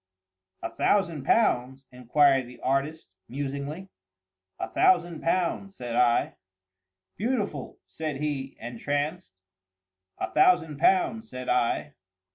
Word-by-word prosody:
"A - - -3
thousand 170 -9 +1
pounds?" 135 - +2
inquired 130 +1 +3
the 125 - -13
artist, 140 +4 -1 0.2
musingly. 140 +7 -5 0.7
"A - - -2
thousand 175 +5 +2
pounds," 185 +3 -1
said 120 -2 -5
I. 120 -1 +2 0.8
"Beautiful!" 205 - -2
said 155 -2 -5
he, 140 -2 -3
entranced. 145 - -3 0.8
"A - - -3
thousand 160 -2 +3
pounds," 220 +4 +2
said 130 0 -6
I. 115 -12 +1
145 Hz, 100 wpm, -27 LUFS, 130-175 Hz, 0.8 s, inquired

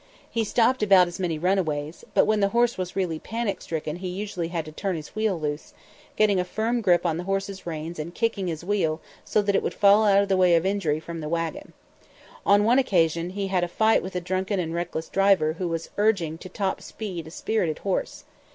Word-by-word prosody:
He 230 - 0
stopped 240 +3 +2
about 195 -4 +6
as 175 - -7
many 170 -4 -1
runaways; 160 -3 -1
but - - +5
when 215 -1 +2
the 200 - +3
horse 240 +2 +2
was 180 -1 -5
really 175 -5 -1
panic 225 0 -3
stricken 155 0 -4
he 185 +1 -5
usually 180 -2 -4
had 165 -2 -3
to 155 - -9
turn 190 +4 -2
his 155 -2 -8
wheel 215 -5 0
loose, 150 0 -4 0.4
getting 205 -3 +3
a - - +2
firm 225 +6 -1
grip 180 -4 +3
on 165 -2 +1
the 175 - -5
horse's 195 -1 -3
reins 160 0 -5
and 155 - -3
then 175 - -12
kicking 225 -5 -1
his 165 -1 -4
wheel 175 -6 0 0.2
so 210 - +1
that 200 -1 +1
it - - +3
would - - -3
fall 205 +1 +5
out 200 -1 +5
of - - -3
the 195 - +2
way 180 -2 +5
of 165 +2 +2
injury 190 -6 0
from 165 +1 -7
the 150 -1 -5
wagon. 165 0 -3 0.7
On 205 +1 +5
one 240 +5 +4
occasion 170 - +1
he 195 +1 -3
had 185 -2 +1
a - - 0
fight 220 +5 +3
with 185 0 -7
a 180 - -1
drunken 185 +2 -1
and 165 -2 -2
reckless 170 -2 -3
driver 195 -6 +3
who 180 - -1
was 165 -1 -4
urging 185 -7 +1
to 185 - -9
top 195 0 -2
speed 180 -7 -6
a - - -8
spirited 175 -2 -1
horse. 195 - -2
185 Hz, 230 wpm, -25 LUFS, 165-200 Hz, 0.7 s, about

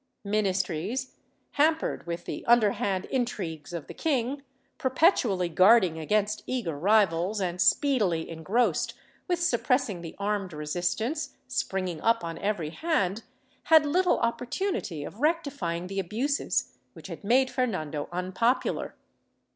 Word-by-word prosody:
Ministries, 200 +3 -1 0.4
hampered 315 - +1
with 170 0 -4
the - - -5
underhand 205 -5 +3
intrigues 185 - -3
of 170 -4 -5
the - - -9
king, 275 -2 -1 0.4
perpetually 255 - +2
guarding 185 -1 +5
against 210 +6 0
eager 235 - -2
rivals, 195 +2 +2
and 180 -2 -2
speedily 205 - +2
engrossed 185 +9 0 0.3
with 355 -2 0
suppressing 250 - +1
the 165 -2 -8
armed 200 -3 -2
resistance 175 - -2
springing 190 -9 -2
up 230 -3 +2
on 165 -1 -5
every 190 -7 -2
hand, 220 - 0 0.4
had 315 -2 +6
little 360 +5 +2
opportunity 235 - -2
of 200 - -9
rectifying 280 - -1
the 195 +1 -4
abuses 235 +10 -1 0.2
which - - -13
had - - -8
made 255 +5 +3
Fernando 155 - -2
unpopular. 185 +8 -1
205 Hz, 120 wpm, -27 LUFS, 175-255 Hz, 0.4 s, had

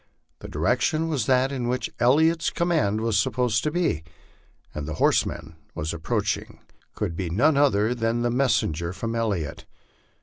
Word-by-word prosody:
The - - -9
direction 160 +1 0
was 140 -9 -1
that 130 +1 +3
in 125 -3 -3
which 125 +1 -2
Elliot's 160 +7 +3
command 115 - 0
was 110 -3 +1
supposed 120 0 +1
to 150 - +1
be, 165 - 0 0.7
and 75 -1 -5
the 80 - -4
horseman 80 0 0 0.2
approaching 80 +1 -2 0.4
could 85 - -3
be 90 -1 -3
none 140 - +3
other 125 -6 +3
than 120 0 -1
a 120 - +1
messenger 105 - 0
from 115 +3 -4
Elliot. 105 -10 -2
115 Hz, 145 wpm, -25 LUFS, 95-135 Hz, 0.7 s, that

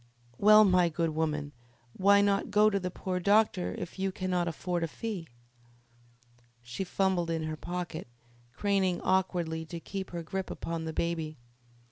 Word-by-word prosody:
"Well, 215 +1 +8
my 180 -2 +4
good 165 0 -1
woman, 150 -2 -1 0.4
why 200 +1 +5
not 200 -1 +1
go 210 +1 +4
to 200 - +1
the 180 -1 -3
poor 185 0 -3
doctor 205 -1 +2
if 180 +1 -7
you 190 0 0
cannot 185 -2 -1
afford 175 +1 -2
a - - 0
fee?" 190 0 -5 1.4
She 120 +10 -4
fumbled 185 -2 0
in 165 -1 -1
her 155 0 -3
pocket, 175 -1 -5 0.4
craning 190 +4 +1
awkwardly 175 -4 0
to 170 +1 -7
keep 195 +3 -6
her 170 -1 -5
grip 190 +3 -4
upon 165 -1 -4
the 160 - -3
baby. 160 -2 -2
180 Hz, 155 wpm, -30 LUFS, 165-195 Hz, 1.4 s, Well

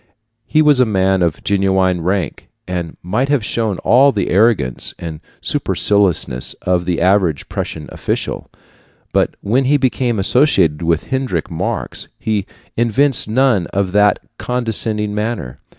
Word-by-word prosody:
He 155 +2 +3
was 145 -3 +4
a 125 - +5
man 95 -2 +1
of 85 -3 -1
genuine 95 -2 +1
rank, 95 +2 -2 0.2
and 90 -3 -4
might 110 +10 -1
have 140 -7 +1
shown 110 -2 -1
all 135 +4 +5
the 105 - -2
arrogance 100 - +1
and 80 -3 -7 0.2
superciliousness 95 -11 +1
of 90 -1 +1
the 90 -1 -1
average 90 -4 +2
Prussian 75 -2 -5
official; - - -4 0.6
but - - +1
when 125 +6 +1
he 145 +3 +3
became 125 -3 0
associated 95 - +2
with 85 - -1
Heinrich 130 - -2
Marx - - -4
he 105 -3 -2 0.3
evinced 120 +2 +2
none 115 -6 +2
of 95 -1 -1
that 105 +1 +4 0.2
condescending 110 -3 -1
manner. 105 - -3
100 Hz, 135 wpm, -17 LUFS, 90-120 Hz, 0.6 s, a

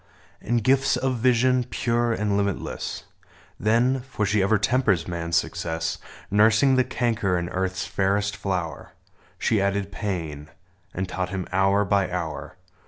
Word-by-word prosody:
And 120 0 0
gifts 135 +2 +3
of 130 -1 -1
vision, 125 +1 +3
pure 120 -1 0
and 105 -2 0
limitless: 100 -2 -2 0.6
Then 120 +6 +2
— 130 - -19
for 105 -5 -1
she 100 +1 +2
ever 105 +3 +3
tempers 105 -4 +1
man's 85 -1 -2
success, 80 -1 -1 0.3
Nursing 110 +6 +5
the 130 - +4
canker 110 -7 0
in 85 0 -3
Earth's 95 0 -2
fairest 100 +1 0
flower 90 -6 -4 0.2
— - - -34
She 110 -3 +1
added 100 0 -1
pain; 80 -7 -4 0.4
and 95 +1 -3
taught 90 0 -3
him, 95 -1 -3
hour 95 +2 +3
by 100 -1 +1
hour. 85 -2 -4
100 Hz, 150 wpm, -24 LUFS, 90-115 Hz, 0.6 s, Nursing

